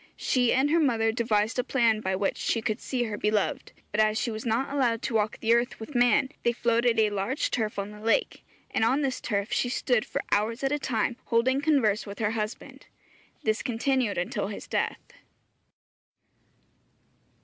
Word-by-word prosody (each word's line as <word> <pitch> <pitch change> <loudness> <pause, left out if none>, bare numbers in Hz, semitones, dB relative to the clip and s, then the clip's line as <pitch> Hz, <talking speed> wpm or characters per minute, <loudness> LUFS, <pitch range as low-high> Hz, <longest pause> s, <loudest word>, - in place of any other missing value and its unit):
She 250 -2 +2
and 275 +3 +2
her 335 - +4
mother 230 -7 +2
devised 220 0 0
a - - +2
plan 230 -4 +2
by 190 -2 -1
which 195 +1 -1
she 230 - 0
could 220 +1 -2
see 250 -2 -1
her 215 -3 -4
beloved, 210 -1 0 0.2
but 210 - -2
as 215 0 +3
she 240 - -1
was 220 +2 -5
not 250 +5 0
allowed 240 -5 +1
to - - -2
walk 215 0 0
the 225 0 +2
earth 240 +1 0
with 225 +6 -8
man, 245 +1 +3
they 235 - +1
floated 235 0 +2
a 215 -1 +3
large 205 +8 -1
turf 220 -3 -1
on 200 +1 -3
the 210 - -11
lake, 225 - 0 0.3
and - - 0
on 260 +6 +3
this 260 -2 -2
turf 200 +1 -2
she 245 - +1
stood 245 -2 +1
for - - -4
hours 225 +5 0
at 270 - +1
a 295 - 0
time 235 -2 -1
holding 255 +4 +2
converse 245 -10 +2
with 200 0 -7
her 215 -2 0
husband. 215 0 -5 0.6
This 215 0 0
continued 250 -2 0
until 175 +2 -2
his 205 - -7
death. - - -3
230 Hz, 190 wpm, -27 LUFS, 215-250 Hz, 0.6 s, her